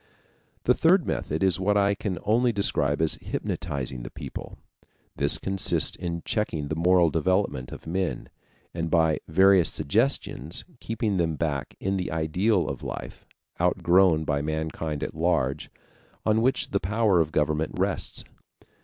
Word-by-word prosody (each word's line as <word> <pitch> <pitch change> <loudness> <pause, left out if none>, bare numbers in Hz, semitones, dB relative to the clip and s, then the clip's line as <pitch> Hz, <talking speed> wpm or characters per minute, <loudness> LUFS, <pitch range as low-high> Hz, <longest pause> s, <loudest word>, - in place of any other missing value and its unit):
The - - +4
third 175 +1 +3
method 80 +5 -2
is 95 -1 +2
what 105 +2 +2
I 100 0 +3
can 100 -3 -3
only 120 +4 +3
describe 80 -8 +1
as 80 - 0
hypnotizing 65 -2 -4
the - - -7
people. - - -8 0.6
This - - +3
consists 95 -1 +1
in 85 -1 -4
checking 80 -9 -1
the 80 - -1
moral 85 0 +4
development 85 -6 0
of - - -9
men, 90 +2 -2 0.4
and 85 -1 -3
by 80 -2 +3
various 95 +1 +5
suggestions 100 - -1
keeping 110 -3 -2
them 80 -2 0
back 70 -4 -3
in 95 +1 -1
the 90 - -3
ideal 85 +5 +1
of 70 -2 -5
life, - - -7 0.3
outgrown 85 -3 +3
by 70 -2 -1
mankind 80 0 -3
at - - -4
large, 80 -5 0 0.6
on 110 +1 +3
which 130 +3 0
the 100 - +1
power 105 0 +2
of 80 -1 -2
government 75 +1 0
rests. - - -2
85 Hz, 145 wpm, -26 LUFS, 80-100 Hz, 0.6 s, various